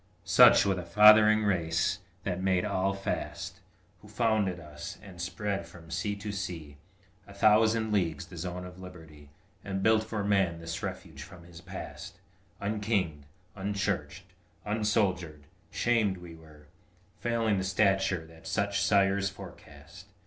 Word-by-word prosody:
Such - - +7
was 95 -2 +1
the - - -3
fathering 105 +4 +7
race 85 -5 0 0.2
that 95 -1 -3
made 95 0 +1
all 95 -1 0
fast, 95 0 -4 0.4
Who 105 - -15
founded 105 -4 0
us, 75 -2 -9
and 90 -4 -10
spread 100 0 -3
from 85 -1 -14
sea 100 +5 -2
to 105 +1 -6
sea 85 -7 -6 0.5
A 100 - -13
thousand 110 +2 +3
leagues 90 -4 0
the 90 - -13
zone 90 +2 -5
of 90 0 -11
liberty, 80 -6 -12 0.3
And 95 -1 -3
built 110 +1 +4
for 110 -2 -4
man 95 -5 +1
this 85 0 -5
refuge 70 - -6
from 85 +2 -12
his 85 0 -13
past, - - -9 0.4
Unkinged, 100 -8 -1 0.3
unchurched, 95 -4 -3 0.4
unsoldiered; 100 -7 0 0.3
shamed 110 -5 +1
were 90 - -12
we, 85 +3 -18
Failing 115 -4 0
the - - -2
stature 95 -2 +1
that 80 +2 -14
such 100 +1 0
sires 100 -1 +3
forecast! 85 -2 -13
95 Hz, 140 wpm, -29 LUFS, 85-105 Hz, 0.5 s, Such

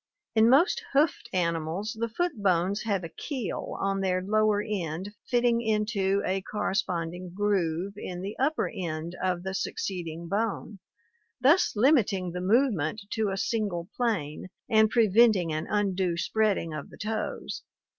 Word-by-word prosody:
In 220 +1 +5
most 290 - +4
hoofed 285 -4 +2
animals 170 +4 -1
the 230 0 -1
foot 350 +10 0
bones 190 +1 +2
have 200 -4 0
a - - -3
keel 255 - -4
on 195 0 0
their 185 -1 +1
lower 215 +2 +2
end 190 -2 -4 0.2
fitting 240 -1 +3
into 210 -3 +1
a 190 +1 0
corresponding 180 -4 -2
groove 195 -2 0
in 180 -2 -6
the 200 +2 -4
upper 300 +4 +1
end 165 -1 -4
of 180 -2 0
the 190 0 -3
succeeding 170 -4 -4
bone, 210 0 -2 0.6
thus 285 +6 +4
limiting 210 - +3
the 180 +1 -4
movement 210 - +2
to 220 -2 0
a 195 - -2
single 195 -5 -1
plane 185 -12 -1 0.2
and 220 -2 +4
preventing 215 -6 +4
an 155 +1 -3
undue 190 -4 0
spreading 195 -2 0
of 155 -2 -6
the - - -14
toes. 215 +1 -4
200 Hz, 145 wpm, -28 LUFS, 180-220 Hz, 0.6 s, In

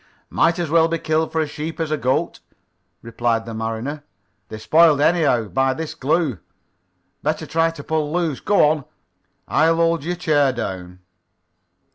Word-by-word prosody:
"Might 170 0 +2
as 170 -4 -3
well 165 0 +4
be 165 0 -1
killed 160 0 -1
for 160 - 0
a - - 0
sheep 150 +2 -6
as 160 -2 -2
a - - +2
goat," 130 -3 -1 0.6
replied 115 -1 -1
the 115 - -7
mariner. 115 +7 -4 0.5
"They're 110 - -7
spoiled 155 +7 +4
anyhow, 145 -7 +2
by 135 0 +1
this 160 +1 -5
glue. 155 -3 0 0.8
Better 155 +1 -2
try 165 +1 +1
to 165 -3 -9
pull 155 -1 -2
loose. 165 -5 -1
Go 205 -7 +3
on. 150 -3 -1 0.6
I'll 165 +1 +3
hold 165 -2 +1
your 175 +3 -2
chair 145 -5 +2
down." 90 -6 -6
155 Hz, 160 wpm, -21 LUFS, 130-165 Hz, 0.8 s, well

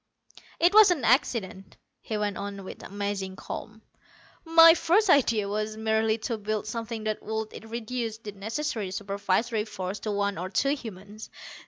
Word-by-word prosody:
"It 345 +3 +4
was 430 -2 +8
an 335 -8 0
accident," 210 - 0 0.2
he 220 - -4
went 205 -1 -1
on 200 -1 -6
with 190 - -9
amazing 200 -1 -4
calm. 220 +3 -8 0.6
"My 330 0 +8
first 355 +4 +3
idea 230 - +3
was 215 +1 -3
merely 220 0 +1
to 230 -4 -2
build 215 0 -2
something 225 0 -5
that 215 0 -2
would 220 0 -5
reduce 230 -1 -4
the 215 -2 -8
necessary 220 +1 -3
supervisory 200 +3 -1
force 200 -2 -5
to 215 - -3
one 200 -3 -1
or 185 +2 -4
two 255 +8 +1
humans. 215 -5 -9
215 Hz, 155 wpm, -27 LUFS, 200-235 Hz, 0.6 s, was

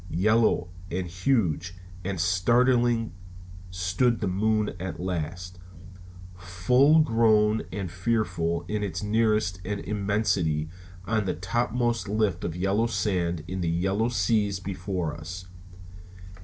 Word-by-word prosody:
Yellow 110 -2 +3 0.2
and 90 +1 -2
huge 90 - 0 0.3
and 95 -1 -3
startling 115 +5 +2 0.6
stood 95 +7 0
the 105 - -1
moon 105 +3 +1
at 85 -2 -5
last, 90 0 -4 0.8
full 110 - +3
grown 110 -4 +3
and 95 -3 -4
fearful 90 -4 -1
in 105 +1 -2
its 90 -3 -3
nearness 105 -3 +1
and 100 +2 -3
immensity 100 -7 0 0.4
on 110 +1 0
the 90 - -1
topmost 120 +3 -1
lift 105 -5 0
of 85 - -3
yellow 100 +5 +1
sands 90 -7 -1
in 95 0 -4
the 85 - 0
yellow 95 +7 0
seas 100 -2 +1
before 90 -3 -3
us. 90 +3 -8
95 Hz, 115 wpm, -26 LUFS, 90-110 Hz, 0.8 s, Yellow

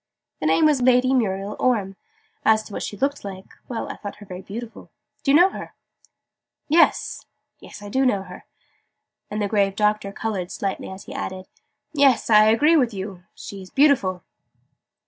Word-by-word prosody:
"The 155 - -1
name 160 - +4
was 295 -4 +3
Lady 255 +1 +4
Muriel 200 -4 -1
Orme. 205 -6 +1 0.5
As 220 0 +4
to 215 - -12
what - - -4
she - - -5
was 280 +6 -1
like 190 -1 -7 0.2
well, 235 -3 -4
I - - -7
thought 205 -1 -7
her 210 - -13
very 185 -1 -8
beautiful. 225 +4 -9 0.3
Do 290 - -2
you 285 - +7
know 360 +3 +6
her?" - - -9 0.9
"Yes 320 +3 +2 0.5
I 205 - -9
do 260 +6 +1
know 205 -7 +1
her." 180 -1 -12 0.8
And 210 - -4
the - - 0
grave 200 -2 +1
Doctor 210 -1 +1
coloured 200 -4 -4
slightly 195 -1 -4
as 190 0 -9
he 275 - -10
added 190 -9 -5 0.5
"Yes, 275 -6 +3
I 215 0 +7
agree 260 +10 +4
with 245 -8 +2
you. 190 -2 -7
She 200 -1 -9
is 185 - -12
beautiful." 250 - +2
210 Hz, 175 wpm, -23 LUFS, 195-255 Hz, 0.9 s, you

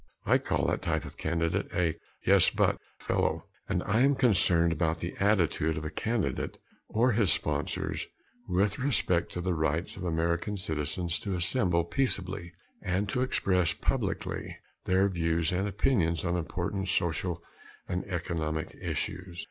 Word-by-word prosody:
I - - +4
call - - 0
that - - 0
type - - -1
of - - -9
candidate 85 0 -1
a 85 -2 +2 0.3
"yes, - - +6
but" - - +1 0.2
fellow. - - 0 0.2
And - - 0
I 110 +4 +1
am 140 +1 +5
concerned 90 -9 +3
about 80 +1 0
the 85 - -4
attitude 85 -6 +2
of 75 - -4
a 75 - -3
candidate 110 +5 -2 0.3
or 120 +4 +3
his 105 -4 +4
sponsors - - -1 0.4
with 95 +2 +1
respect 120 -10 +1
to 90 - -3
the 90 0 0
rights 80 +2 -1
of 95 - -6
American 85 +4 0
citizens 80 0 -2
to 100 -2 -3
assemble 90 -1 +3
peaceably 90 -3 -1 0.3
and 95 +3 0
to 125 - 0
express 95 -9 +2
publicly - - -2 0.3
their 95 +1 +3
views 85 -3 +1
and 95 +3 0
opinions 95 -5 +1
on 85 0 +1
important 90 +3 -2
social 85 0 -1 0.4
and 90 +1 -2
economic 80 -4 -3
issues. 90 -1 -4
90 Hz, 150 wpm, -29 LUFS, 85-100 Hz, 0.4 s, yes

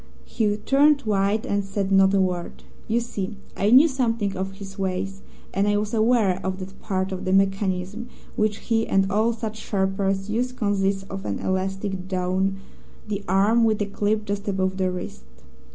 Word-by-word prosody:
"He 210 -2 0
turned 280 +6 +4
white 210 -1 +1
and 200 0 0
said 195 0 -2
not 195 0 +6
a - - +4
word. 180 -2 -2 0.2
You 230 +2 +2
see, 210 -3 -4 0.2
I 200 - +1
knew 265 +7 +8
something 230 -7 -1
of 190 +1 -3
his 195 0 -10
ways, 190 +1 -2 0.3
and 200 +2 +1
I 205 0 +3
was 210 +1 -2
aware 220 -5 +2
of 190 0 -2
that 190 +1 -9
part 190 0 -2
of 185 - -4
the 185 - -1
mechanism 195 +3 0 0.3
which 215 -1 +1
he 225 -1 0
and 195 0 +2
all 220 +4 +3
such 220 -1 -5
sharpers 195 -1 -1
use 245 +4 -1
consists 195 -4 0
of 195 0 -7
an - - -2
elastic 190 0 -2
down 190 +1 0 0.5
the 205 -1 -3
arm 205 +5 +4
with 220 -2 +2
a 205 - +1
clip 210 +1 -1
just 200 0 -3
above 190 -1 0
the 185 -1 +1
wrist. 180 - -6
195 Hz, 180 wpm, -24 LUFS, 190-215 Hz, 0.5 s, knew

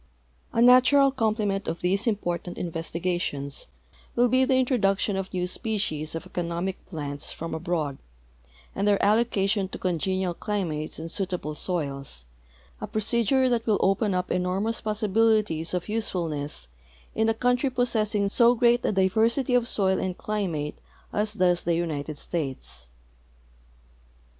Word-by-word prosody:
A 230 - +3
natural 260 +3 +6
complement 215 -5 -1
of 165 - -3
these 195 +6 +1
important 175 -5 -2
investigations 165 -4 -3 0.5
will 245 +1 +4
be 260 +2 +4
the 265 0 +2
introduction 210 -6 +1
of 195 0 -4
new 180 -1 -1
species 180 -7 -2
of 165 - -5
economic 175 +1 -3
plants 145 -4 -5
from 165 +1 -6
abroad 160 -4 -2 0.7
and 200 +1 -1
their 205 -1 +3
allocation 205 -2 +2
to - - -7
congenial 185 +1 -1
climates 170 -7 -3
and 160 - -5
suital)le 180 -6 -2
soils, 140 - -3 0.6
a 210 - -4
jn'ocedure 235 +4 +2
that 235 -1 0
will 210 -2 +3
open 195 +1 +2
u}) 180 0 +1
enormous 185 +5 -1
possibilities 215 -5 +1
of 180 -1 -2
usefulness 165 - -2 0.5
in 220 0 +1
a 225 - +1
country 245 +3 +1
possessing 220 -5 +1
so 235 +4 +5
great 240 +1 +3
a - - +1
diversit}^ 225 +7 +2
of 240 -1 +2
soil 190 -4 +2
and 185 -1 -3
climate 175 -9 -3 0.3
as 210 +1 -1
does 180 -3 +2
the 170 0 +1
United 155 -3 -3
States. 135 - -5
195 Hz, 135 wpm, -26 LUFS, 170-225 Hz, 0.7 s, natural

